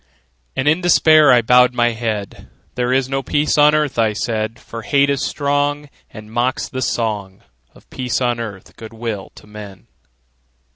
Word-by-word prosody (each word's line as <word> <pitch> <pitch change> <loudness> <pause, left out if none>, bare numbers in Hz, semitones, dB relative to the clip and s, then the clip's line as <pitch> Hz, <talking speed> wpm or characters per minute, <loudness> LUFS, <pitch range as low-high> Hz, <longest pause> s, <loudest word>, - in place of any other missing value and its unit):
And 135 +2 -1
in 160 +4 +3
despair 155 -3 +5
I 120 -2 +4
bowed 125 +2 +4
my 120 0 +2
head; 110 -3 -5 0.2
"There 125 0 -1
is 130 0 +1
no 135 0 -2
peace 145 +2 0
on 150 0 +5
earth," 150 -5 -1
I 110 -2 +2
said: 110 +1 -3
"For 115 - -9
hate 140 +6 +2
is 140 - -1
strong, 145 0 -1 0.2
And 110 -1 -12
mocks 120 +3 -1
the 130 -3 -6
song 105 -5 -3 0.3
Of - - -20
peace 125 -3 -2
on 120 -2 -1
earth, 100 -5 -8
good 110 0 -11
will 110 -4 -5
to - - -15
men!" 105 -3 -11
120 Hz, 175 wpm, -18 LUFS, 110-140 Hz, 0.3 s, despair